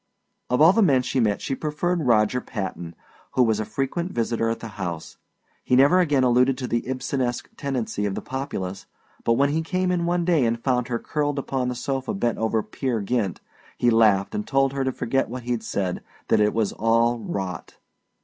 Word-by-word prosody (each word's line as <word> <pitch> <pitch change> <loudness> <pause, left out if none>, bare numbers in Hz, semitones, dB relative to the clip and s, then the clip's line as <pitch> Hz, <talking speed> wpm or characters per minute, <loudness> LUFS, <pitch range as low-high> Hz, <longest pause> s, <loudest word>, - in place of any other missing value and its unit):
Of 125 +3 +2
all 165 +4 +8
the 225 - +3
men 135 -10 +4
she 130 - -1
met 105 -4 +1
she - - -2
preferred 155 +2 -1
Roger 115 +2 +3
Patton, 95 -7 -5 0.4
who 130 - +4
was 110 -2 +1
a 110 - -2
frequent 135 - -2
visitor 115 -1 0
at 115 - -2
the 115 - -7
house. 85 -3 -5 0.5
He 125 - +2
never 140 +8 +6
again 145 -7 +3
alluded 125 +1 +3
to 125 - -4
the 120 -1 0
Ibsenesque 130 -1 -2
tendency 125 -7 -2
of 95 - -3
the - - -4
populace, 100 -8 -5 0.4
but 115 - +3
when 140 +4 +3
he 155 +3 0
came 185 +2 -1
in 170 -1 0
one 175 0 +1
day 165 -6 +3
and 115 0 0
found 125 -1 0
her 120 - -1
curled 145 +2 -2
upon 135 -2 -2
the 125 - -2
sofa 135 - -3
bent 120 - -1
over 110 -1 0
"Peer 130 -5 -2
Gynt" 100 -2 -1 0.4
he 120 - +3
laughed 105 -4 +3
and 210 0 -3
told 135 0 +2
her 135 -1 -1
to 130 - 0
forget 135 +2 -1
what 125 +1 -6
he'd 120 -1 -2
said 95 -3 -2 0.3
that 110 - +4
it 105 0 +2
was 110 -3 0
all 115 +1 +2
rot. 95 -4 -5
125 Hz, 205 wpm, -24 LUFS, 110-140 Hz, 0.5 s, all